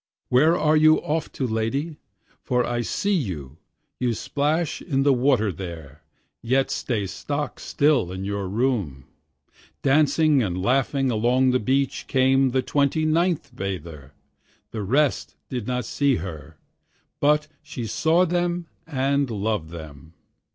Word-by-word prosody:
Where 155 +7 +4
are 155 -2 +3
you 155 0 +6
off 160 +1 -2
to, 135 - -2
lady? 125 +8 -2 0.4
for 125 -2 0
I 120 0 -1
see 200 - -1
you, 80 - -3 0.4
You 120 -2 0
splash 150 +7 -1
in 135 -5 0
the 140 -1 +4
water 125 -5 +2
there, 80 -6 -9 0.4
yet 130 +4 +1
stay 110 -6 -2
stock 145 +8 -4
still 140 - +1
in 95 +1 -5
your 100 -1 -3
room. 100 - -1 0.8
Dancing 150 +1 +3
and 95 -5 -2
laughing 135 +5 +1
along 125 +4 +2
the 125 - +2
beach 135 +4 0
came 135 0 +3
the 130 +1 0
twenty 145 +4 +1
ninth 160 -4 0
bather, 85 - -6 0.6
The 110 - -4
rest 120 - +1
did 125 -4 -4
not 125 -2 -2
see 140 +3 +1
her, 80 - -7 0.6
but 150 +1 +3
she 120 - -6
saw 160 - +2
them 175 0 -1 0.2
and 140 -2 0
loved 105 -6 -2
them. 80 -1 -11
130 Hz, 135 wpm, -24 LUFS, 100-145 Hz, 0.8 s, you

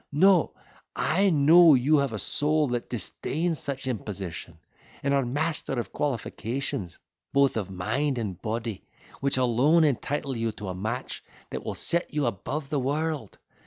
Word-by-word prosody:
No, 180 +3 +4 0.4
I 195 +6 +2
know 160 +1 +7
you 140 +5 +3
have 140 -3 +1
a 110 - -3
soul 150 +6 +2
that 120 -1 -3
disdains 155 - -2
such 135 -1 -4
imposition; 95 - -5 0.5
and 140 0 +1
are 140 -1 +3
master 145 +4 -2
of 120 -3 -3
qualifications, 120 - -3 0.4
both 140 -1 +4
of 105 -4 -2
mind 120 +10 -1
and 100 -6 -4
body, 110 -2 -3 0.4
which 140 -1 0
alone 130 +7 +4
entitle 140 -1 0
you 115 -1 -1
to 105 -2 -7
a - - -3
match 110 +7 -4 0.3
that - - -4
will - - -4
set 170 +1 0
you 150 -2 +1
above 135 +7 -3
the 145 - +1
world. 145 -2 -2
135 Hz, 155 wpm, -27 LUFS, 115-150 Hz, 0.5 s, know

